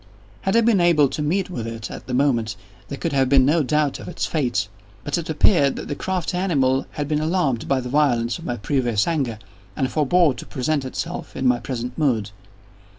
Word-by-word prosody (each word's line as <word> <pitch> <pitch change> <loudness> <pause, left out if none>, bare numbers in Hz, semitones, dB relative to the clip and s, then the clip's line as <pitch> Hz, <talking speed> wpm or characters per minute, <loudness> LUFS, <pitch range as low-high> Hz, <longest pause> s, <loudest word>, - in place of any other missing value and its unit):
Had 190 - 0
I 230 - +6
been 220 -5 +3
able 155 -5 +4
to 150 - -4
meet 175 +6 0
with 115 -9 -4
it, 115 0 -6
at - - -9
the 125 - -2
moment, 125 -5 +1 0.3
there - - -6
could - - -3
have 135 -2 +2
been 135 -1 +5
no 155 +4 +3
doubt 150 0 0
of - - -9
its 175 - -3
fate; 120 -10 0 0.4
but 145 - -2
it 165 - -7
appeared 150 -2 +3
that - - -7
the - - -1
crafty 180 +3 -2
animal 135 -8 +1
had 145 -1 -3
been 150 0 0
alarmed 155 -8 0
at 130 -2 +2
the - - -5
violence 120 -4 +1
of - - -10
my 120 - -2
previous 120 -2 0
anger, 135 -9 -1 0.4
and 130 -2 -1
forebore 155 +1 +3
to 120 - -9
present 135 +2 -1
itself 165 +6 -5
in 135 - -3
my 125 -1 +3
present 125 0 -5
mood. 115 -9 +1
140 Hz, 215 wpm, -22 LUFS, 125-155 Hz, 0.4 s, I